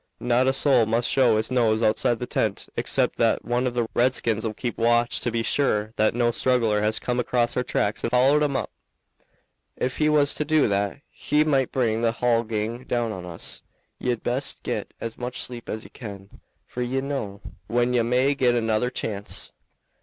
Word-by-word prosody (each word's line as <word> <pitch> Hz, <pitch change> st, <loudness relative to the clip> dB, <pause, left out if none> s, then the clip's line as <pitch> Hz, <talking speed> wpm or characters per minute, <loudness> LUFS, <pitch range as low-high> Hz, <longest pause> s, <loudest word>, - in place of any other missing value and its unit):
"Not 125 Hz, +1 st, +2 dB
a -, -, +5 dB
soul 135 Hz, -5 st, +3 dB
must 115 Hz, +2 st, +1 dB
show 125 Hz, -5 st, +4 dB
his 110 Hz, +3 st, -2 dB
nose 115 Hz, -3 st, +2 dB
outside 110 Hz, +2 st, +2 dB
the 125 Hz, -, -4 dB
tent -, -, -1 dB
except -, -, 0 dB
that -, -, +1 dB
one 120 Hz, +1 st, 0 dB
of 120 Hz, -, -4 dB
the 120 Hz, -2 st, 0 dB
redskins'll 115 Hz, -3 st, +1 dB
keep 120 Hz, -2 st, -4 dB
watch 120 Hz, +1 st, +2 dB
to 120 Hz, -, -1 dB
be 115 Hz, 0 st, -1 dB
sure 110 Hz, -5 st, +1 dB
that 110 Hz, +1 st, +2 dB
no 120 Hz, -1 st, +2 dB
straggler 115 Hz, -4 st, +1 dB
has 110 Hz, +1 st, +2 dB
come 125 Hz, 0 st, -1 dB
across 120 Hz, 0 st, +1 dB
our -, -, +1 dB
tracks 105 Hz, -4 st, -1 dB
and -, -, 0 dB
followed 130 Hz, +5 st, +4 dB
'em 145 Hz, -2 st, +1 dB
up. -, -, -2 dB, 1.1 s
Ef 130 Hz, -, -2 dB
he 155 Hz, 0 st, +2 dB
was 145 Hz, -2 st, +3 dB
to -, -, -2 dB
do 155 Hz, -1 st, +3 dB
that, 100 Hz, +6 st, -1 dB
he 150 Hz, +1 st, +1 dB
might 135 Hz, -4 st, +1 dB
bring 115 Hz, -3 st, 0 dB
the 115 Hz, -1 st, +1 dB
hull 120 Hz, -1 st, +2 dB
gang 115 Hz, +2 st, -3 dB
down 120 Hz, -2 st, -1 dB
on 95 Hz, -4 st, -7 dB
us. 85 Hz, -2 st, -6 dB, 0.4 s
Ye'd 120 Hz, -3 st, -2 dB
best 130 Hz, +3 st, -2 dB
get -, -, -3 dB
as 115 Hz, -1 st, -6 dB
much 125 Hz, 0 st, -4 dB
sleep 120 Hz, -1 st, -5 dB
as 110 Hz, -, -4 dB
ye -, -, -14 dB
can, 100 Hz, -4 st, -10 dB, 0.2 s
for 125 Hz, -, -6 dB
ye 125 Hz, +2 st, -1 dB
don't 135 Hz, -, -4 dB
know 105 Hz, -8 st, -4 dB, 0.3 s
when 120 Hz, +2 st, +1 dB
ye 120 Hz, -, +3 dB
may 125 Hz, +4 st, +2 dB
get 125 Hz, -3 st, +2 dB
another 115 Hz, +1 st, +1 dB
chance." 105 Hz, -5 st, -4 dB
120 Hz, 200 wpm, -24 LUFS, 110-125 Hz, 1.1 s, a